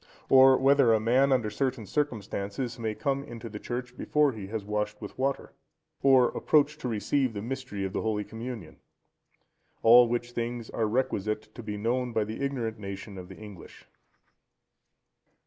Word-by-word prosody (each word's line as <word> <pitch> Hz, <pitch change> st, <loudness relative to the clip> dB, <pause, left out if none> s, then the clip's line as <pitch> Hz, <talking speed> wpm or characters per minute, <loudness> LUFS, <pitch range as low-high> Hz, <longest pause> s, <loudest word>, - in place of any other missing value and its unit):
Or 130 Hz, 0 st, +7 dB
whether 135 Hz, -4 st, +5 dB
a -, -, +2 dB
man, 125 Hz, +5 st, +3 dB
under 120 Hz, -5 st, +1 dB
certain 130 Hz, -1 st, -2 dB
circumstances, 115 Hz, -2 st, -3 dB
may 110 Hz, -2 st, -2 dB
come 140 Hz, +1 st, -1 dB
into 115 Hz, -3 st, -8 dB
the 105 Hz, -1 st, -7 dB
church 125 Hz, +1 st, -5 dB
before 150 Hz, +1 st, +2 dB
he 105 Hz, -5 st, -8 dB
has 105 Hz, 0 st, -5 dB
washed 105 Hz, 0 st, -2 dB
with 105 Hz, -, -8 dB
water? 135 Hz, +1 st, -2 dB, 0.5 s
Or 130 Hz, -3 st, +5 dB
approach 150 Hz, 0 st, +2 dB
to -, -, -4 dB
receive 125 Hz, +3 st, 0 dB
the 100 Hz, -, -3 dB
Mystery 130 Hz, -5 st, -4 dB
of 95 Hz, -, -5 dB
the -, -, -1 dB
Holy 110 Hz, -2 st, -1 dB
Communion? 115 Hz, -6 st, -8 dB, 1.1 s
All 120 Hz, +2 st, +8 dB
which 120 Hz, +1 st, -2 dB
things 120 Hz, -1 st, -4 dB
are 110 Hz, -, 0 dB
requisite 110 Hz, -3 st, -2 dB
to 120 Hz, -, -8 dB
be 105 Hz, -2 st, -5 dB
known 120 Hz, +3 st, -1 dB
by 110 Hz, -, +2 dB
the 110 Hz, +6 st, -5 dB
ignorant 120 Hz, -5 st, -2 dB
nation 100 Hz, 0 st, -7 dB
of 90 Hz, 0 st, -10 dB
the 95 Hz, -, -11 dB
English. 105 Hz, -5 st, -12 dB
115 Hz, 165 wpm, -28 LUFS, 105-130 Hz, 1.1 s, All